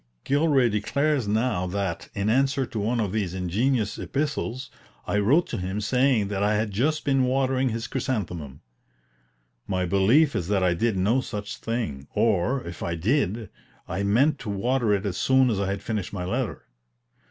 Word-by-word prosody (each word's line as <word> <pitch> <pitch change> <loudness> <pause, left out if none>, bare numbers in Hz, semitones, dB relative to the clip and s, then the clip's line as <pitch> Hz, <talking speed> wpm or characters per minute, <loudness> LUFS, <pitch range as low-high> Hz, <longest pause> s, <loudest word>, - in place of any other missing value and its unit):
Gilray 140 -3 +3
declares 130 +5 0
now 105 -4 0
that, 95 -2 -3
in 100 +1 -1
answer 135 +3 +2
to 115 -3 -5
one 115 +4 0
of 105 -4 0
these 100 -4 -2
ingenious 105 +5 0
epistles, 135 -3 -3 0.3
I 105 - 0
wrote 140 - +3
to 115 - -3
him 95 +3 -3
saying 120 -1 +2
that 100 -1 -2
"I 105 +1 +2
had 105 0 -1
just 150 +10 0
been 135 -2 +3
watering 130 0 +1
his 115 0 -3
chrysanthemum." 90 - -4 1.1
My 95 -2 0
belief 110 - +3
is 85 - -1
that 100 -1 +1
I 90 -1 +3
did 110 +3 0
no 110 +8 +2
such 105 -4 -6
thing; 80 - -4
or, 115 +5 +1
if 85 - -8
I 85 - -2
did, 110 - 0 0.4
I 95 +4 -3
meant 125 +9 +2
to 110 - -6
water 115 +3 0
it 100 0 +1
as 95 -3 -2
soon 130 -1 +3
as 100 - -1
I 100 - 0
had 100 +1 -3
finished 105 -5 -3
my 90 -3 -3
letter. 120 +4 -2
110 Hz, 175 wpm, -25 LUFS, 95-130 Hz, 1.1 s, Gilray